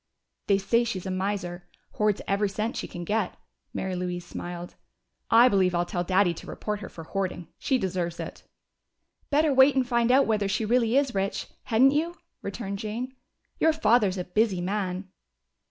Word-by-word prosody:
"They 200 -2 +4
say 215 +5 +2
she's 200 -6 -3
a 190 - -2
miser. 185 -2 -3 0.3
Hoards 210 -1 +2
every 200 +1 +1
cent 215 +4 -2
she - - -3
can 175 - -7
get." 205 +1 -1 0.3
Mary 190 -1 -3
Louise 180 -1 -3
smiled. 175 0 -7 0.6
"I 235 +2 +7
believe 190 -5 +3
I'll 175 0 +1
tell 175 0 -2
Daddy 185 0 +3
to - - -11
report 210 -1 -4
her 200 - -7
for 165 - -10
hoarding. 180 -1 -3
She 265 - +1
deserves 180 -5 -2
it!" - - -6 0.9
"Better 300 0 +3
wait 265 +1 +6
and 260 -2 +2
find 235 -1 +2
out 270 +2 +5
whether 210 -3 +1
she 210 +3 0
really 235 +2 +3
is 275 -2 +2
rich, 195 0 -2 0.2
hadn't 250 +4 +5
you?" 325 +4 0 0.3
returned 200 -1 -4
Jane. 235 +5 -4 0.4
"Your 320 - +4
father's 225 -10 +3
a 180 - -2
busy 195 +1 +1
man." 185 0 -2
200 Hz, 175 wpm, -27 LUFS, 185-235 Hz, 0.9 s, I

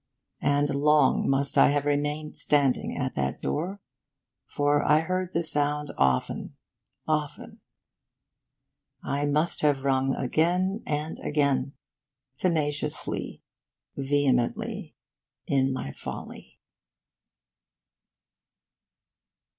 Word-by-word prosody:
And 145 0 +2
long 150 +2 +3
must 135 +1 +1
I - - +7
have 145 0 0
remained 145 +1 -1
standing 140 -3 +1
at 130 -2 -2
that 65 -1 -2
door, 185 - -3 0.7
for 145 0 +1
I 150 +1 +4
heard 185 +2 -2
the 170 - 0
sound 150 -1 +1
often, 65 -1 0 0.5
often. 150 -2 -3 1.4
I 145 +1 -1
must 150 +4 0
have 145 -3 +2
rung 135 -1 +1
again 180 - +1
and 150 +1 -3
again, 140 -2 0 0.7
tenaciously, 150 -4 -2 0.5
vehemently, 135 -3 0 0.5
in 135 -1 +2
my 100 - -4
folly. - - -9
145 Hz, 90 wpm, -27 LUFS, 135-150 Hz, 1.4 s, I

